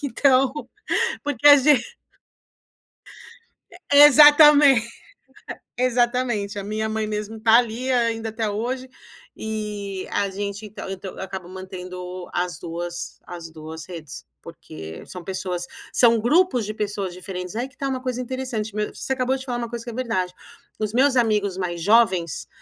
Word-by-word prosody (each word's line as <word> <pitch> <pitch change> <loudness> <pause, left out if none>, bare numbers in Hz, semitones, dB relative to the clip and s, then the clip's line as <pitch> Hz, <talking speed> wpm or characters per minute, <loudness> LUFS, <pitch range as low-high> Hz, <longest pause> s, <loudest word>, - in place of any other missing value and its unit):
Então, 265 -1 +3 0.7
porque 290 -1 +2
a 290 - +11
gen 280 0 +5 1.9
E 350 -5 -1
exatamen 295 -2 +8 1.0
exatamente, 240 -4 0
a 200 - -5
minha 215 +1 -2
mãe 220 0 -2
mesmo 215 +1 -5
tá 225 +1 +6
ali 245 +2 0
ainda 230 -3 0
até 220 0 -2
hoje 250 +5 -3 0.5
e 210 -3 -5
a 200 -1 0
gente 200 +2 -5
então 205 -1 -9
então 190 0 -6
eu - - -7
acabo 190 -2 -7
mantendo 185 -1 -8
as 175 0 -2
duas 175 +1 -6
as 170 -2 -8
duas 160 0 -9
redes, 160 -5 -9 0.2
porque 80 +1 -10
são 180 -2 -9
pessoas 180 -2 -4 0.3
são 230 -2 +4
grupos 255 0 +2
de 215 - -5
pessoas 205 -3 -3
diferentes. 180 +2 -7
Aí 245 +3 -2
que 260 - -25
tá 275 - -3
uma 260 -1 -3
coisa 255 -1 -3
interessante, 250 -4 -4
me 210 0 -1
você 265 - -4
acabou 260 0 0
de 265 - -8
falar 245 -2 -3
uma 235 -1 -4
coisa 235 -1 -6
que 240 - -6
é 225 - -9
verdade. 225 -8 -2 0.5
Os 215 -1 -2
meus 265 +2 +3
amigos 210 -5 +1
mais 175 -2 -3
jovens, 190 - +2
220 Hz, 155 wpm, -23 LUFS, 185-250 Hz, 1.9 s, a